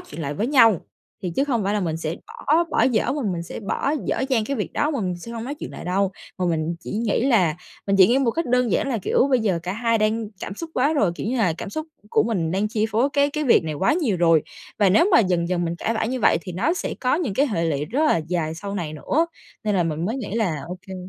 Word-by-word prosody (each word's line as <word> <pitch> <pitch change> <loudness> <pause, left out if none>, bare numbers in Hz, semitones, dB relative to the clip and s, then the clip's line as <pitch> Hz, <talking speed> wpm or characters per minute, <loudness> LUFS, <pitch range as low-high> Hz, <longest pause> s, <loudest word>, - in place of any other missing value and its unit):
chuyện 155 - -10
lại 145 0 -3
với 210 +10 -1
nhau, 230 - +5 0.4
thì 180 - -2
chứ 275 - +3
không 245 -6 0
phải 200 +2 0
là 210 - +1
mình 165 -4 -1
sẽ 165 +1 -3
bỏ 320 +4 +1
bỏ - - +2
dở 235 -4 +2
mà 290 0 -2
mình 170 -1 -3
sẽ 170 - -7
bỏ 245 +6 -1
dở - - -1
dang 240 -5 +2
cái 275 +4 -2
việc 210 - -3
đó 295 - +1
mà 280 -6 -2
mình 180 -3 -2
sẽ 230 +7 -9
hông 230 -1 -5
nói 280 +4 -4
chuyện - - -7
lại - - -9
đâu. 190 +2 0 0.3
Mà 185 - 0
mình 165 0 -1
chỉ - - -8
nghĩ 230 +2 +1
là 185 - +3 0.3
mình 195 0 +2
chỉ 190 -2 +8
nghĩ 245 +3 +3
một 265 -4 +2
cách 330 +8 -2
đơn 250 -1 +2
giản - - +1
là 245 -4 0
kiểu 215 - +2
bây 255 -2 +3
giờ 195 -6 +1
cả 180 +1 -3
hai 230 +2 +1
đang 215 +1 0
cảm 200 - -5
xúc 325 +9 -7
quá 280 +5 +2
rồi, 210 - +2
kiểu - - -5
như 250 +3 -1
là 190 -7 +2
cảm - - -6
xúc 310 +7 -4 0.2
của - - +4
mình 185 -8 -1
đang 195 +4 0
chi 215 0 0
phối 235 +6 +2
cái 285 0 +3
cái 300 +1 -2
việc 240 - +4
này 155 -1 -3
quá 190 +6 +2
nhiều 295 - +1
rồi 165 -3 +4 0.4
và 205 -3 +5
nếu 325 - +4
mà 230 - +7
dần 180 -4 +1
dần 175 -1 0
mình 170 0 -2
cãi 225 +6 -1
vã 220 - 0
như 255 +3 -2
vậy - - +4
thì 180 - -8
nó 195 - +1
sẽ - - -3
có 255 0 +2
những 295 - -1
cái 280 +6 +3
hệ 185 - -1
lụy 150 -3 0
rất 265 - 0
là 305 - +4
dài 165 -3 -1
sau 200 +4 -6
này 170 -6 -3
nữa. 300 - 0 0.4
Nên 210 -1 +1
là 185 - +3
mình 160 0 -2
mới 225 +7 -1
nghĩ 220 -6 -5
là 180 -11 0
ô 180 +1 -6
kê. 190 - -7
210 Hz, 295 wpm, -23 LUFS, 175-255 Hz, 0.4 s, chỉ